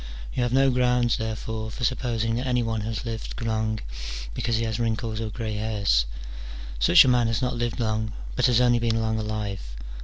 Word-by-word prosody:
You - - -1
have 120 -1 +1
no 135 +1 +4
grounds, 125 -1 +2
therefore, 110 0 -4
for 120 - -7
supposing 115 -2 0
that 130 +2 -2
any 125 -1 +2
one 115 -1 -1
has 110 +1 -4
lived 115 -1 -5
long, 110 -1 -1 0.5
because 115 - -1
he 115 - 0
has 110 -1 -2
wrinkles 115 -1 -1
or 110 - -2
grey 110 -1 -4
hairs: 100 - +1 0.7
such - - +7
a - - +2
man 125 -2 +4
has 115 +2 0
not 125 +1 0
lived 120 +1 -2
long, 110 -1 -1 0.2
but - - +3
has 125 -2 +4
only 120 -1 +4
been 115 -1 +1
long 110 0 0
alive. 105 -2 -3
115 Hz, 195 wpm, -25 LUFS, 110-120 Hz, 0.7 s, such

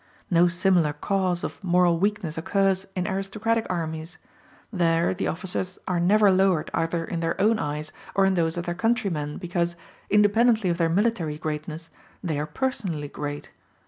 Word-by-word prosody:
No 175 0 +5
similar 175 -3 +2
cause 185 -1 -1
of - - -6
moral 175 -2 +3
weakness 195 -5 -1
occurs 195 +2 +1
in 180 0 -1
aristocratic 215 +3 -1
armies: 165 0 -4 0.6
there 170 -2 +2
the 185 - -2
officers 185 +2 -3
are 180 -2 0
never 200 +3 +5
lowered 185 -4 +2
either 165 0 -1
in 170 - -3
their 165 0 -2
own 215 +2 +3
eyes 150 0 -3 0.2
or 195 - +4
in 190 - +3
those 165 -2 0
of 175 - -3
their 175 - -1
countrymen, 180 -8 -1
because, 175 -1 -1 0.3
independently 210 0 +4
of 170 - -3
their 165 -1 +3
military 180 -5 0
greatness, 155 +1 -5 0.3
they 160 -5 -1
are 150 - -2
personally 190 - -3
great. 145 0 -6
180 Hz, 160 wpm, -25 LUFS, 165-195 Hz, 0.6 s, No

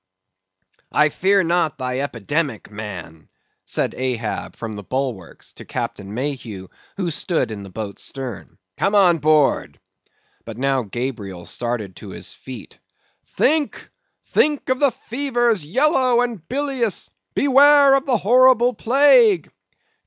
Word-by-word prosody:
"I 150 0 +3
fear 195 +5 +2
not 170 -3 0
thy 125 0 -3
epidemic, 140 -1 -3
man," 90 -7 -8 0.4
said - - -1
Ahab 120 -4 -3
from 110 -2 -6
the 105 - -7
bulwarks, 125 -5 -5
to - - -11
Captain 100 -1 -5
Mayhew, 120 -8 -5 0.3
who 180 -4 -2
stood 160 -5 -1
in 105 -2 -6
the 100 - -10
boat's 100 0 -7
stern; 130 -9 -7 0.2
"come 200 +1 +1
on 180 -5 +5
board." 150 -1 +2 0.6
But 115 -1 -9
now 135 0 +1
Gabriel 105 -6 -5
started 115 -6 -4
to - - -10
his - - -8
feet. 125 -5 -11 0.6
"Think, 300 0 0 0.3
think 295 -3 +1
of 260 0 +1
the 285 - +5
fevers, 240 - -1
yellow 255 - +2
and 230 -9 -4
bilious! 265 -5 -2 0.2
Beware 280 0 +6
of 275 0 +1
the 250 -3 +3
horrible 245 +4 +4
plague!" 290 - +4
155 Hz, 130 wpm, -21 LUFS, -, 0.6 s, Beware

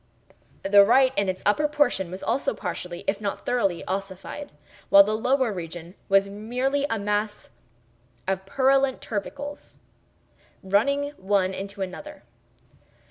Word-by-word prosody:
The 200 +1 +7
right, 260 +5 +4
in 200 -1 +1
its 185 - -4
upper 255 +9 +3
portion, 290 -11 +1
was 185 +2 -7
also 270 - 0
partially, 180 -2 -5
if 200 +1 -1
not 200 -2 -4
thoroughly, 200 -8 0
ossified, 195 +9 -5 0.4
while 200 0 +9
the 215 +2 -1
lower 250 0 +1
region 175 -1 -7 0.2
was 195 0 +4
merely 250 +8 -1
a 225 - 0
mass 210 - -2 0.8
of 190 0 -1
purulent 270 +3 +2
tubercles, 285 +7 -6 0.9
running 280 +10 +1
one 190 -1 +1
into 200 +1 -5
another. 295 +11 -8
205 Hz, 130 wpm, -25 LUFS, 195-265 Hz, 0.9 s, while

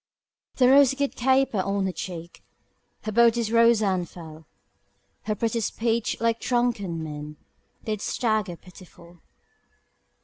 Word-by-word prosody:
The 250 - +4
rose 270 0 +6
did 280 0 -2
caper 260 -3 +2
on 195 +1 -1
her 190 - -1
cheek, 175 -2 -8 0.6
Her 215 - -3
bodice 230 0 +3
rose 230 -1 +4
and 185 -4 0
fell, 160 -2 -12 0.8
Her 215 - -1
pretty 230 +2 -1
speech, 230 +1 -1
like 230 0 0
drunken 215 -9 -1
men, 150 -1 -7 0.5
Did 215 -2 -3
stagger 215 -7 -1
pitiful. 175 -1 -17
215 Hz, 125 wpm, -25 LUFS, 175-235 Hz, 0.8 s, rose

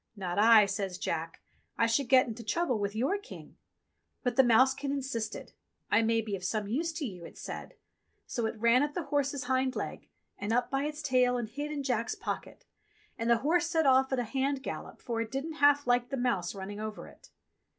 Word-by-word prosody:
"Not 185 -2 -3
I," 220 -1 +7
says 195 -2 -3
Jack. 165 -2 -4 0.4
"I 230 - +4
should 235 +3 +1
get 260 -1 +6
into 230 0 -7
trouble 255 +1 0
with 200 0 -2
your 270 - 0
King." 420 - -12 0.7
But 245 -2 0
the 265 - +7
mousekin 265 +4 +3
insisted. 260 -5 -4 0.4
"I 205 - +5
may 225 0 +2
be 210 -2 -3
of 185 - -8
some 210 +2 -1
use 315 +10 -1
to 315 -2 -3
you," 180 -7 -7
it - - -11
said. - - -7 0.5
So 235 -2 -2
it 220 - -5
ran 235 +3 +5
up 290 0 -1
the 350 - -2
horse's 285 -2 -1
hind 260 +1 0
leg - - -5 0.3
and 205 +2 -3
up 245 +1 +1
by 275 +1 0
its 300 0 -5
tail 250 -3 +3
and 240 -2 -3
hid 290 +6 -5
in 290 -2 -3
Jack's 235 -4 -1
pocket. - - -6 0.5
And 230 +1 -1
the 235 - +5
horse 340 +2 +3
set 325 -2 +1
off 265 0 +4
at 265 - +1
a 245 - +1
hand 270 +3 -1
gallop, - - -7
for 230 -2 -2
it 225 - -4
didn't 300 +5 -4
half 285 0 +5
like 245 0 +2
the 275 - -3
mouse 215 -8 -1
running 200 +1 -6
over 215 0 -5
it. - - -17
245 Hz, 215 wpm, -30 LUFS, 220-275 Hz, 0.7 s, I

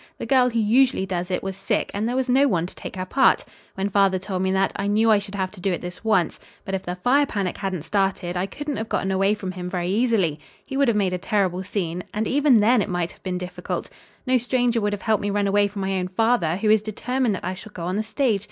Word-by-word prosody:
The - - -5
girl 255 -2 +4
who 235 - -3
usually 230 -1 +3
does 180 -1 -3
it 180 - -2
was 195 -1 -4
sick 195 +1 -1
and 210 +3 -1
there 245 - -2
was 260 0 0
no 265 +3 +4
one 175 -9 +1
to 180 - -8
take - - -8
her 185 0 -3
part. 265 +8 +3 0.3
When 195 +1 -1
father 195 -1 +3
told 185 0 -4
me 190 0 +1
that, 190 0 +1
I 200 - -2
knew 220 +2 +3
I 210 - +5
should 200 0 -8
have 190 -1 -2
to 195 - -13
do 195 - 0
it 175 - -2
this 180 +3 -8
once, 215 -7 +1 0.3
but 195 - -5
if 190 - -1
the 180 0 -4
fire 265 +10 +3
panic 195 -7 -2
hadn't 190 -5 -3
started 190 -1 -1
I 180 +2 -1
couldn't 290 +7 -5
have 220 0 -4
gotten 195 - 0
away 195 +2 +2
from 195 -3 -5
him 180 -1 -6
very 180 -1 -2
easily. 200 -8 +1 0.3
He 270 - -6
would 280 0 +3
have 230 -3 +2
made 190 -3 +1
a 180 - -2
terrible 185 -2 0
scene. 180 -3 -3
And 215 +1 0
even 275 -3 +4
then, 230 +2 +4
it - - -2
might 175 -1 -1
have - - -19
been 185 -1 -3
difficult. 180 0 -5 0.3
No 255 -1 +3
stranger 245 -1 +1
would 205 0 0
have 205 - -5
helped 220 -1 +2
me 205 - -1
run 205 0 +1
away 205 +1 +3
from 200 0 -6
my 190 0 -1
own 180 - -2
father, 185 -4 +1
who 210 +2 +2
is 215 -1 +5
determined 235 +2 -1
that - - -7
I 185 - -2
shall 210 +3 -11
go 175 - -7
on 180 +2 -2
the 210 - +1
stage. 225 -1 0
200 Hz, 275 wpm, -23 LUFS, 185-225 Hz, 0.3 s, I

